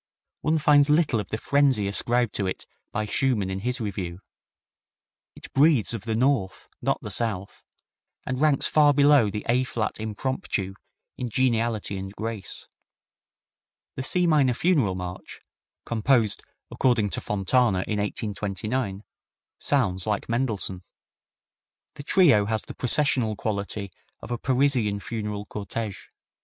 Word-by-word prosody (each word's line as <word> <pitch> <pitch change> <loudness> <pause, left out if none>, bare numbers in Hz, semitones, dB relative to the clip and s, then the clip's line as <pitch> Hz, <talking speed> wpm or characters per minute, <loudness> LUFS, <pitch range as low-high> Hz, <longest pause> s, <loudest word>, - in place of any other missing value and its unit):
One 155 +1 +1
finds 145 -1 +4
little 150 -6 +3
of 105 - -5
the 110 - -2
frenzy 135 -5 +2
ascribed 120 +3 +1
to 100 - -1
it 95 - -4 0.3
by 105 +1 -2
Schumann 105 -4 0
in 95 - -3
his 125 +5 -2
review. 95 -5 -4 1.2
It - - -12
breathes 140 -5 +4
of 110 -2 -5
the 110 -1 -1
North, 120 -6 0
not - - 0
the 105 - -5
South, 100 -2 -3 0.6
and 130 +1 -3
ranks 150 -3 +3
far 145 -2 +4
below 140 -6 +5
the 105 +1 -5
A 125 +2 +3
flat 115 -4 -3
Impromptu 110 - -3 0.4
in 125 - -3
geniality 115 -4 0
and 95 +1 -7
grace. 110 -3 -6 1.3
The - - -3
C 180 +7 +1
minor 145 -7 +3
Funeral 140 - +2
March, 90 0 -7 0.4
composed, 115 -1 +2 0.3
according 115 -6 +1
to - - -2
Fontana, 105 -1 +1
in 105 -1 -1
1829, 105 +1 -3 0.6
sounds 100 -9 0
like 105 -1 -1
Mendelssohn. 115 -6 -1 1.1
The 145 - -9
trio 140 - +4
has 110 +1 -1
the - - -9
processional 125 -4 +3
quality 100 -1 -3 0.3
of - - -9
a 120 - -2
Parisian 125 -6 +1
funeral 105 -1 -4
cortege. 105 0 -5
115 Hz, 135 wpm, -25 LUFS, 100-130 Hz, 1.3 s, below